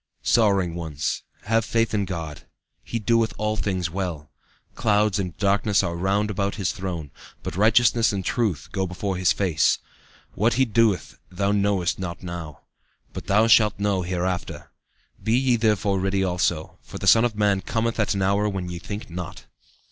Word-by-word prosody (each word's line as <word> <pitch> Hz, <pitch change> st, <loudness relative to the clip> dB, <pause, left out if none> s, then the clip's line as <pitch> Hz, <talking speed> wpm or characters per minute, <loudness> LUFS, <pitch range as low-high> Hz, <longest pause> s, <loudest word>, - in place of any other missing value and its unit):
"Sorrowing 100 Hz, -6 st, +3 dB
ones, 80 Hz, -4 st, -3 dB, 0.2 s
have 115 Hz, +1 st, +1 dB
faith 115 Hz, +1 st, 0 dB
in 100 Hz, -2 st, +1 dB
God. 80 Hz, -5 st, -6 dB, 0.4 s
He 115 Hz, -, -4 dB
doeth 115 Hz, 0 st, +1 dB
all 105 Hz, +1 st, -1 dB
things 95 Hz, -5 st, -2 dB
well. 85 Hz, -6 st, -4 dB, 0.4 s
Clouds 105 Hz, -1 st, +2 dB
and 90 Hz, -5 st, -4 dB
darkness 100 Hz, 0 st, +2 dB
are 85 Hz, -, -2 dB
round 100 Hz, +4 st, 0 dB
about 100 Hz, 0 st, -1 dB
His 95 Hz, -5 st, -1 dB
throne, 85 Hz, -6 st, -5 dB, 0.3 s
but -, -, -5 dB
righteousness 115 Hz, +3 st, +4 dB
and 95 Hz, -2 st, -3 dB
truth 110 Hz, -, -1 dB
go 95 Hz, -1 st, -1 dB
before 95 Hz, +2 st, -3 dB
His 90 Hz, -2 st, +3 dB
face. 90 Hz, -6 st, +2 dB, 0.6 s
What 110 Hz, +4 st, +1 dB
He 130 Hz, +1 st, +3 dB
doeth 110 Hz, -7 st, +1 dB
thou 100 Hz, +2 st, -1 dB
knowest 100 Hz, -4 st, +1 dB
not 90 Hz, -2 st, -5 dB
now, 85 Hz, -4 st, -7 dB, 0.5 s
but -, -, -7 dB
thou 105 Hz, +3 st, +4 dB
shalt 110 Hz, -2 st, +5 dB
know 100 Hz, -2 st, 0 dB
hereafter. 90 Hz, 0 st, -3 dB, 0.5 s
Be 110 Hz, +3 st, +2 dB
ye 130 Hz, -1 st, +3 dB
therefore 105 Hz, -4 st, +1 dB
ready 95 Hz, +1 st, 0 dB
also, 90 Hz, -3 st, -1 dB
for -, -, -10 dB
the -, -, -6 dB
Son 115 Hz, -, +6 dB
of 120 Hz, -3 st, 0 dB
man 100 Hz, -2 st, +2 dB
cometh 115 Hz, +2 st, -2 dB
at 105 Hz, -2 st, +1 dB
an 95 Hz, -, 0 dB
hour 100 Hz, +2 st, +2 dB
when 95 Hz, -3 st, -4 dB
ye 85 Hz, -1 st, -5 dB
think 100 Hz, +4 st, -7 dB
not." 90 Hz, -4 st, -7 dB
100 Hz, 170 wpm, -24 LUFS, 90-105 Hz, 0.6 s, Son